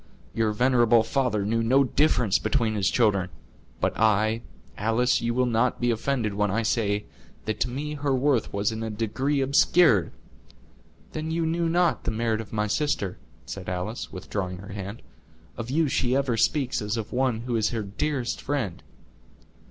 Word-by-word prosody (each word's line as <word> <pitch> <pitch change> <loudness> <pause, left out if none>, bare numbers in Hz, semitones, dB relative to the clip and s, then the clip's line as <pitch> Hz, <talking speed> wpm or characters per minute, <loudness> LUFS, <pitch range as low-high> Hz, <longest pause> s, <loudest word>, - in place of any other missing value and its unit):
Your 110 -1 +1
venerable 120 0 +4
father 115 -4 0
knew 115 +2 +1
no 130 +5 +4
difference 125 -6 +2
between 115 -6 0
his 100 -2 +1
children; 100 -6 +2 0.5
but - - 0
I—Alice, 110 - +1
you 120 0 -1
will 125 0 +3
not 120 +1 +1
be 120 0 +2
offended 115 -2 -1
when 105 0 0
I 110 +4 0
say, 105 -2 0 0.4
that 110 - -2
to 125 - 0
me 145 +4 -4
her 145 -2 0
worth 130 -3 +1
was 100 +2 0
in 110 0 -5
a 115 - -3
degree 120 +7 -1
obscured—" 135 - +4 1.0
"Then 155 0 -3
you 165 0 0
knew 165 +1 0
not 175 0 +1
the - - 0
merit 115 0 0
of 110 - -11
my 105 -1 0
sister," 105 -4 -1 0.3
said 95 -2 -7
Alice, 95 +6 -4
withdrawing 95 0 -4
her 100 +2 -9
hand; 100 +2 -7 0.5
"of 115 0 -6
you 155 +3 +2
she 125 -1 +1
ever 135 -3 +1
speaks 130 +2 +1
as 105 +2 -2
of 110 -2 -5
one 125 -3 +1
who 120 0 -3
is 110 -1 +2
her 115 -3 -3
dearest 125 +5 -2
friend." 120 -12 -2
115 Hz, 170 wpm, -26 LUFS, 105-130 Hz, 1.0 s, venerable